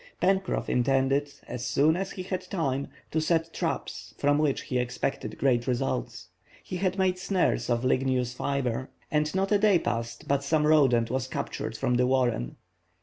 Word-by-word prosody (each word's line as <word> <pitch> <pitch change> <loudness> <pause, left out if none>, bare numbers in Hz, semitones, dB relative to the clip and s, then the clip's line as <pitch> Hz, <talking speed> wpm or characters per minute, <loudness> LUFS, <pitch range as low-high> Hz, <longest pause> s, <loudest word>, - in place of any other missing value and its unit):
Pencroff 190 +1 +1
intended, 135 +3 +2 0.2
as 125 0 -5
soon 140 +6 +3
as 190 +1 -2
he 185 - -5
had 185 -1 -3
time, 140 -7 -1 0.2
to 160 - +1
set 165 0 0
traps, - - -4
from 145 +1 +2
which 150 -3 +1
he 125 - -1
expected 125 +2 -3
great 120 -3 +2
results. 65 - -2 0.3
He 180 - -5
had 190 +1 0
made 185 -1 +1
snares 185 -6 0
of 120 0 +1
ligneous 130 -1 +1
fibre, 130 -2 -2 0.2
and 150 0 +1
not 195 +1 0
a 205 - +4
day 205 -3 +5
passed 115 -6 -3
but 140 0 +1
some 150 +1 +2
rodent 130 -7 +4
was 130 0 -1
captured 115 -3 -4
from 125 -2 +1
the 125 0 +3
warren. 125 - +1
140 Hz, 170 wpm, -27 LUFS, 125-165 Hz, 0.3 s, day